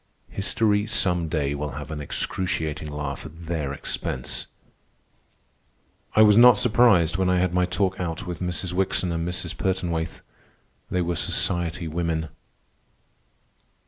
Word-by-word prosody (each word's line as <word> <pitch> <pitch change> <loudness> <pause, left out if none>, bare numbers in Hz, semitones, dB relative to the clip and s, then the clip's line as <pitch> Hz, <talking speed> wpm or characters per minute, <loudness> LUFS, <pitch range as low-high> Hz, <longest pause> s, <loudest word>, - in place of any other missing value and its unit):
History, 105 +2 +1
some 90 -6 +1
day, 70 -3 -1
will 75 0 -4
have 75 +1 -7
an 75 -1 -4
excruciating 80 0 -2
laugh 75 -1 -5
at 80 +1 -11
their 80 -4 -2
expense." 65 -2 -3 1.7
I 110 - +7
was 105 -1 +6
not 120 0 +8
surprised 105 -9 +4
when 95 -1 +1
I 90 - +3
had 90 -1 +1
my 90 0 +2
talk 95 0 0
out 85 -2 -3
with 90 -2 -5
Mrs. 90 0 -2
Wickson 90 -1 +1
and 85 0 -2
Mrs. 90 - -3
Pertonwaithe. 85 -4 -2 0.7
They 90 -1 0
were 85 0 -1
society 85 0 0
women. 80 -1 -2
85 Hz, 135 wpm, -24 LUFS, 80-95 Hz, 1.7 s, not